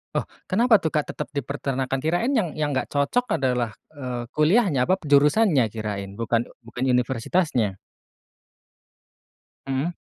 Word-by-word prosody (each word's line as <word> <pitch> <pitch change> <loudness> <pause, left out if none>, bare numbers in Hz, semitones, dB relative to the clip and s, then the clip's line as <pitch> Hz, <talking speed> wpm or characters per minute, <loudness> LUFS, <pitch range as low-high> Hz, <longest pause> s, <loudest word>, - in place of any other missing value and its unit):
Oh, - - 0 0.2
kenapa 220 +1 +4
tuh, 160 - 0
Kak, 150 -1 0
tetap - - -5
dipeternakan 135 -1 -2
kirain 175 - +1
yang 215 -10 +1
yang 150 -1 0
nggak 130 -2 -1
cocok 145 +13 +1
adalah, 125 -3 0 0.2
eee, 125 -4 -5
kuliahnya, 165 - +3
apa 185 - +4
p 180 - -15
jurusannya 145 - +4
kirain 100 -2 -5
bukan 115 +1 0 0.2
bukan 125 +2 -5
universitasnya? 125 - +1 1.9
Mmm. 135 +4 0
140 Hz, 130 wpm, -24 LUFS, 125-165 Hz, 1.9 s, kenapa